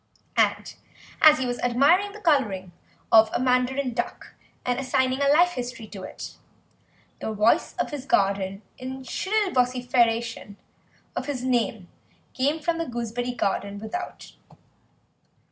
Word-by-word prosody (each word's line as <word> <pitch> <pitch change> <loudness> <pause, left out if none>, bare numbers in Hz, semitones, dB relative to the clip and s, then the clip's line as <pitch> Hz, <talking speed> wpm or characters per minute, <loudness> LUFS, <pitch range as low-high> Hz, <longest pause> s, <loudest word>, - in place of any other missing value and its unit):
And - - +1 0.5
as 305 -1 +8
he 260 - -1
was 245 -1 -3
admiring 295 +12 +3
the 425 - -11
colouring 210 - +1 0.4
of 220 -1 +7
the - - 0
mandarin 255 +1 +1
duck - - -4 0.3
and 245 0 0
assigning 260 0 0
a 280 - +3
life 345 +5 +5
history 245 -6 -5
to 195 - -8
it, - - -8 0.8
the - - -3
voice 220 +9 +2
of - - -2
his 280 -2 -6
aunt 195 -1 +1 0.2
in 260 +1 -6
shrill 390 - -1
vociferation 240 - +1 0.6
of - - -3
his 265 -4 -3
name 230 -6 0 0.5
came 285 +5 0
from 330 +2 -1
the 330 - -2
gooseberry 240 +1 -3
garden 200 -2 -2
without. 220 - -6
250 Hz, 135 wpm, -25 LUFS, 225-280 Hz, 0.8 s, as